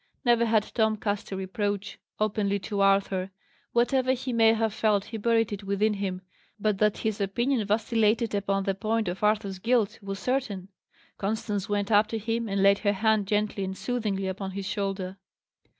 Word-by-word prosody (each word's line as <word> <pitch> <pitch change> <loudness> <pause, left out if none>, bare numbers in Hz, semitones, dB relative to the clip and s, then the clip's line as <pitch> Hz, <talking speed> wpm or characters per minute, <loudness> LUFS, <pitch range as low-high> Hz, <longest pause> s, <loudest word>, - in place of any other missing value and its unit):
Never 235 -1 +4
had 220 -2 +3
Tom 220 -2 +2
cast 205 -1 -3
a - - -2
reproach 200 +1 -3 0.2
openly 205 -1 +1
to 200 +1 -3
Arthur; 195 -1 +2 0.4
whatever 255 +2 +2
he 255 0 -3
may 225 -1 +5
have 225 -2 0
felt 210 -2 +1
he 225 - -6
buried 225 0 +2
it 200 0 -6
within 200 +2 +1
himself; 190 -2 -4 0.3
but 210 -2 0
that 210 -1 +3
his 220 -1 -2
opinion 230 +3 0
vacillated 220 +1 +1
upon 195 -1 0
the 195 - 0
point 220 +2 -1
of 180 +4 -4
Arthur's 210 -3 +1
guilt, 230 0 +1
was 195 -1 -5
certain. 210 -6 -2 0.5
Constance 205 -1 -2
went 205 0 -1
up 210 0 +5
to 225 - -3
him 225 +1 -2
and 195 0 +1
laid 200 0 +5
her 205 -1 +1
hand 215 0 +2
gently 210 -1 0
and 190 0 -4
soothingly 215 -6 -2
upon 190 +1 -4
his 195 +1 -5
shoulder. 195 -2 -3
210 Hz, 180 wpm, -27 LUFS, 195-225 Hz, 0.5 s, may